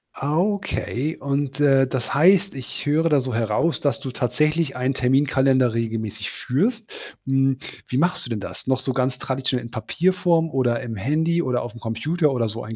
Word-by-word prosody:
Okay, 160 - -1
und, 140 0 -2
äh, 135 -2 +4
das 130 -2 -3
heißt, 185 +5 +4
ich 130 0 -7
höre 155 +3 +2
da 145 -3 +3
so 130 -1 -4
heraus, 115 +7 0
dass 145 - 0
du 130 - -6
tatsächlich 150 +5 0
einen 130 +2 0
Terminkalender 130 -1 +2
regelmäßig 110 -3 -3
führst. 210 - -1 0.4
Hm, 135 0 +2 0.3
wie 125 - -2
machst 175 +6 +1
du - - -8
denn 110 - -2
das? 100 - -7
Noch 130 0 +2
so 130 - -2
ganz 125 0 0
traditionell 130 -1 -1
in 115 - -10
Papierform 170 - +1
oder 130 -4 0
im 120 -3 -5
Handy 160 - +1
oder 125 -6 0
auf'm 120 0 -8
Computer 145 +8 0
oder 120 -4 0
so 110 +2 -5
einen 110 +1 -7
135 Hz, 180 wpm, -23 LUFS, 125-155 Hz, 0.4 s, äh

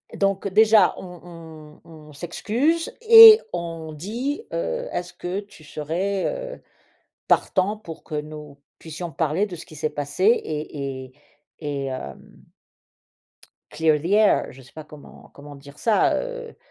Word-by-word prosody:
donc 195 0 0
déjà 215 +2 +5
on 165 -4 -12
on - - -18
on 155 -2 -14
s'excuse 240 - -1
et 450 -1 +10
on 165 -2 -5
dit: 235 - -4
«Heu, - - -3
est-ce 175 0 -5
que 180 +3 -4
tu 200 -6 -14
serais, 175 +7 -3 0.3
heu, - - -24 0.7
partant 195 +2 +1
pour 170 -7 -11
que - - -9
nous 150 -1 -7 0.2
puissions 165 +2 -7
parler 160 +7 0
de 180 -4 -8
ce 160 - -11
qui 155 - -14
s'est 155 +1 -2
passé? 145 +6 -4
Et 145 - -1
et 130 - -21 0.5
et 145 -2 -4
hem, 130 - -8 1.3
clear 155 -1 +1
the 165 - -6
air?» 210 -1 +4
Je 135 +1 -15
sais 130 - -19
pas 155 -1 -10
comment 150 -1 -15
comment 145 0 -12
dire 140 +1 -15
ça, 220 +3 +2
heu. - - -6
165 Hz, 145 wpm, -23 LUFS, 150-210 Hz, 1.3 s, et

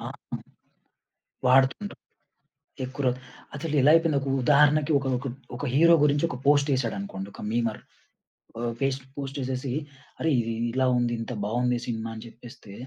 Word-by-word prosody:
ఆ! - - -6 1.4
వాడుతుంటాం. 135 +11 +3 0.9
ఎక్కురో 130 0 -1 0.5
అసలు 155 +1 -4
ఎలా 145 - +6
అయిపోయింది? 165 -3 +3
ఒక 135 - -4
ఉదాహరణకి 150 +2 +4
ఒక 135 - -5
ఒక 125 - -7 0.3
ఒక - - -8
హీరో 170 +4 +6
గురించి 145 +1 +3
ఒక 125 - -5
పోస్ట్ 145 0 +4
యేసాడనుకోండి 100 -6 -2
ఒక - - -11
మీమర్ 115 -1 -1 0.8
ఆహ్, - - -2
పెస్ 115 - -9
ఫేస్‌బుక్ 135 -1 -2
పోస్ట్ 135 0 -5
యేసేసి 130 0 -3 0.5
అరేయ్! 155 -5 +2
ఇ - - -3 0.2
ఇలా 130 +1 +2
ఉంది. 120 -1 0
ఇంత 115 - -6
బావుంది 120 +3 0
సినిమా 115 -1 -3
అని 110 +1 -9
చెప్పేస్తే 115 -2 -13
130 Hz, 150 wpm, -26 LUFS, 120-145 Hz, 1.4 s, ఎలా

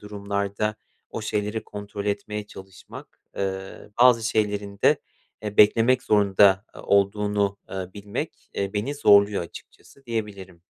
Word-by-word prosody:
durumlarda 100 +1 -3 0.3
o - - -5
şeyleri 105 +1 -2
kontrol 100 0 -7
etmeye 105 +1 -3
çalışmak, 95 -2 -13 0.2
ııı, 95 +1 -5
bazı 120 -2 +6
şeylerin 105 -2 -1
de, - - +5 0.4
eee, 105 -1 -5
beklemek 115 +4 +5
zorunda, 100 -1 +4
eee, - - -10
olduğunu, 100 0 +1
eee, 95 -1 -5
bilmek, 100 0 -6
eee, 100 -1 -2
beni 115 +8 -2
zorluyor 100 -6 +5
açıkçası 135 +9 -14
diyebilirim. 100 -6 -5
100 Hz, 125 wpm, -24 LUFS, 100-105 Hz, 0.4 s, bazı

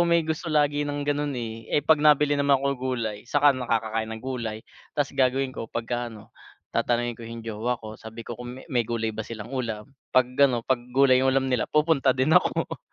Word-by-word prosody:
may 170 -1 +4
gusto 160 +2 -3
lagi 145 -1 +2
ng 145 0 -2
gano'n, 145 -1 -1
eh. 115 -1 -6
Eh, 145 - +1
'pag 155 -1 +4
nabili 150 -1 +5
naman 140 -1 +4
ako 140 - +1 0.3
gulay, 110 -1 -4
saka 145 +1 +5
nakakakain 115 -3 -1
ng 110 +1 -7
gulay. 115 -5 -3 0.4
Tas 145 -2 +1
gagawin 130 0 +1
ko, 115 - -6
pagkaano, 115 -2 -5 0.4
tatanungin 120 0 +1
ko 115 - -10
'yung 115 0 -7
jowa 115 +2 -2
ko, 110 -1 -10
sabi 110 +1 -9
ko, - - -6
kung 125 +1 -7
me 130 - -10
may 120 -2 +2
gulay 115 -2 -1
ba 110 - -5
silang 115 +1 -8
ulam, 115 -2 -4 0.2
'pag 130 - +7 0.2
ano, 120 -2 -2
'pag 130 -2 +1 0.2
gulay 130 -2 +6
'yung 135 - +2
ulam 135 - +2
nila, 125 - 0
pupunta 150 -4 +3
din 130 +4 +2
ako. 180 +2 +2
125 Hz, 205 wpm, -25 LUFS, 115-145 Hz, 0.4 s, pag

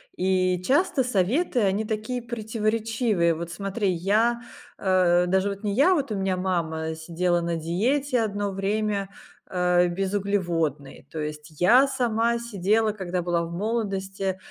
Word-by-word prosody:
И 185 -1 +1
часто 285 - +2
советы- 250 - +1
они 200 +2 +1
такие 220 +3 -3
противоречивые. 220 -4 0
Вот 170 +1 -6
смотри, 195 +3 -2
я, 215 +7 +1 0.4
э, 180 -2 +3
даже 190 +2 +2
вот 200 +1 -6
не 205 -1 -1
я, 290 - +5
вот 280 -8 -1
у - - -1
меня 190 -1 0
мама 160 -4 -2
сидела 170 +2 0
на 170 0 -1
диете 240 - 0
одно 205 -2 -2
время, 200 0 -1 0.4
э, 180 -1 +3
безуглеводной. 175 -6 -2
То 160 - -5
есть 150 0 -7
я 245 +10 +6
сама 235 -3 +1
сидела, 220 -1 +1
когда 185 -3 -3
была 170 -1 0
в 170 - -6
молодости, 195 -2 -2
195 Hz, 140 wpm, -25 LUFS, 175-225 Hz, 0.4 s, я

